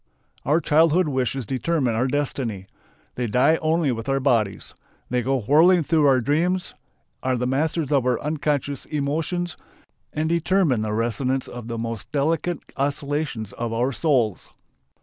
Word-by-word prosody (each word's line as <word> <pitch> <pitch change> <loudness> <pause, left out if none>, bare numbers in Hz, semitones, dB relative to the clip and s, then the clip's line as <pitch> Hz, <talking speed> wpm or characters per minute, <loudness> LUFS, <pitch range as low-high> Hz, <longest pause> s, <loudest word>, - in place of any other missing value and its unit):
Our 150 +5 +3
childhood 160 +2 +3
wishes 130 -1 -1
determine 130 +1 0
our 120 +4 +1
destiny. 130 -8 -2 0.5
They 125 -1 -2
die 125 +9 +3
only 160 -2 +1
with 115 +2 -4
our 135 0 +2
bodies. 115 -7 0 0.4
They 125 0 +1
go 130 +1 0
whirling 165 - +5
through 155 -1 +3
our 130 -2 +4
dreams, 170 +8 0 0.5
are 130 -1 0
the 125 - -1
masters 150 +3 0
of 140 -3 +3
our 125 -2 +1
unconscious 145 -2 -2
emotions, 160 +3 -2 0.5
and 155 +1 -1
determine 170 - +2
the 110 -1 -2
resonance 120 +4 -1
of 120 -2 -8
the 115 -1 -4
most 115 -2 -5
delicate 160 +3 0 0.2
oscillations 140 -5 -2
of 115 -1 -4
our 120 +4 +1
souls. 125 - 0
140 Hz, 150 wpm, -23 LUFS, 120-155 Hz, 0.5 s, whirling